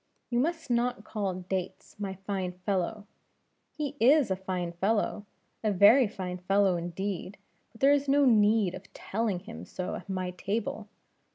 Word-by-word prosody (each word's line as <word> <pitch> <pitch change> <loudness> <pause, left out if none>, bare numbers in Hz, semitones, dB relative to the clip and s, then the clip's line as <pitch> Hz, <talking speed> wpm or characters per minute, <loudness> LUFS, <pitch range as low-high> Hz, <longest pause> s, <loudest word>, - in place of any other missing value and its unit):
You 240 - +2
must 325 0 -1
not 240 -2 0
call 200 -5 -3
Dates, 190 -1 -4
My 195 -2 -3
fine 190 -3 -2
fellow. 200 +1 -1 0.6
He 295 -2 -4
is 265 -1 +5
a - - +2
fine 185 -2 -3
fellow, 205 +3 -1 0.4
a 215 - +2
very 210 +6 +6
fine 180 -2 -5
fellow, 195 0 +3
indeed; 185 +3 -4 0.3
but 225 - -19
there 275 +1 +6
is 285 -1 +1
no 285 +1 +5
need 210 -5 +4
of 190 - -10
telling 205 -3 -2
him - - -9
so 185 0 -5
at - - -7
my 185 -1 -2
table. 205 +3 -3
205 Hz, 160 wpm, -29 LUFS, 185-230 Hz, 0.6 s, very